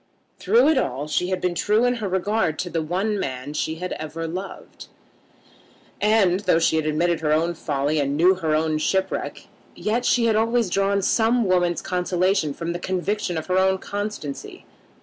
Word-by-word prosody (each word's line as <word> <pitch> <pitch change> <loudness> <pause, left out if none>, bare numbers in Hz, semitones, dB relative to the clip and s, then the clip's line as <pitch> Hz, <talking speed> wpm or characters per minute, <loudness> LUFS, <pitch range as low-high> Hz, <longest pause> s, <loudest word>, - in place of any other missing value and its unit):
Through 460 -6 +4
it 310 -4 +3
all 140 - -2
she 180 +4 -1
had 185 -1 -1
been 180 -1 -1
true 210 +6 +2
in 245 0 +1
her 215 -3 -3
regard 190 -3 0
to 180 - -4
the 165 - -1
one 190 +6 -1
man 130 0 -4
she 160 +1 -2
had 180 +2 -5
ever 155 +1 -5
loved, 185 +4 -7 1.1
and, 205 -4 +3
though 185 -5 +2
she 165 -1 +2
admitted 160 +2 0
her 155 -2 -1
own 165 +3 +2
folly 150 -1 -1
and 140 0 -1
knew 180 +4 +5
her 160 -5 -1
own 155 0 0
shipwreck, 190 +4 -2 0.3
yet 230 +3 -1
she 240 -1 +2
had 225 -2 +2
always 225 -2 +1
drawn 195 +1 +1
some 230 +3 +2
woman's 175 -2 +1
consolation 180 -2 0
from 165 +4 -4
the 175 - -4
conviction 185 0 -2
of 160 - -4
her 185 0 +1
own 190 0 +3
constancy. 200 -8 -6
180 Hz, 180 wpm, -23 LUFS, 160-205 Hz, 1.1 s, knew